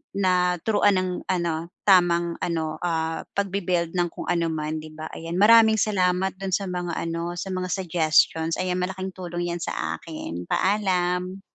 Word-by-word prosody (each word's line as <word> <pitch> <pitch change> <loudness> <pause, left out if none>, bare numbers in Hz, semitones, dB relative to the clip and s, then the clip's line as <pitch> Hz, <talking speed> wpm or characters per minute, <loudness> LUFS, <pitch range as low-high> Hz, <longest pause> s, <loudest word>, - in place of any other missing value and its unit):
naturuan 185 +2 +2
ng 185 0 0 0.2
ano, 170 -2 -1 0.2
tamang 175 -3 +3
ano, 160 -2 -2
ah, 160 -2 -2
pagbi-build 185 -4 0
ng 175 -1 +1
kung - - -8
ano 170 -1 +1
man, 155 0 -3
'di 155 - -9
ba? 155 0 -7
Ayan, 165 +1 -6
maraming 220 +2 +7
salamat 190 -3 +1
do'n 190 -2 0
sa 200 - -2
mga 180 -2 -3
ano, 170 +1 -3
sa 190 +2 -5
mga 185 0 -2
suggestions, 165 -2 +2
ayan 185 0 -1
malaking 190 +1 -3
tulong 175 -1 -4
'yan 170 - -3
sa - - -3
akin. 90 - -7
Paalam! 185 -2 0
180 Hz, 155 wpm, -24 LUFS, 165-190 Hz, 0.2 s, maraming